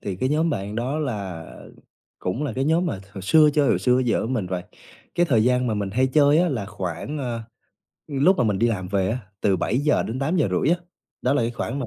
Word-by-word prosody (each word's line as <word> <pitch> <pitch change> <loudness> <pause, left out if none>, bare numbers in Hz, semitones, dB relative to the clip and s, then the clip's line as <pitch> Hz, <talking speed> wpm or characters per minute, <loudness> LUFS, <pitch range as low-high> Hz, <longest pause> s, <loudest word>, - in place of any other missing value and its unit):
thì 95 -2 -4
cái 130 +8 0
nhóm 160 +3 +1
bạn 100 -6 -3
đó 130 +6 -1
là 100 - -4 0.7
cũng 105 +11 -2
là 135 - -2
cái 135 +3 -1
nhóm 165 +4 +2
mà 100 - -3
hồi 95 - -8
xưa 150 - +5
chơi 145 -2 +3
hồi - - +3
xưa 125 0 +3
giờ 120 - +1
với 115 - -2
mình 115 -8 -1
và 90 -1 -3 0.5
cái 175 - +3
thời 115 -8 +3
gian 125 0 +2
mà 110 - 0
mình 100 -2 -2
hay 130 +5 +2
chơi 145 +2 +4
á 175 +1 +3
là 115 -10 -3
khoảng, 95 - -5
à, 120 -4 -3 0.6
lúc 155 +6 +3
mà - - +3
mình 105 -4 +1
đi 120 - +3
làm 95 -5 -2
về 95 0 0
á, 120 - -1 0.2
từ 100 -2 +2
7:00 145 - +1
đến 120 +4 -4
8:30 140 - +1
á, - - -5 0.5
đó 125 - +2
là 120 - +2
cái 115 - 0
khoảng 120 +2 -4
mà 130 - -3
125 Hz, 245 wpm, -23 LUFS, 100-145 Hz, 0.7 s, xưa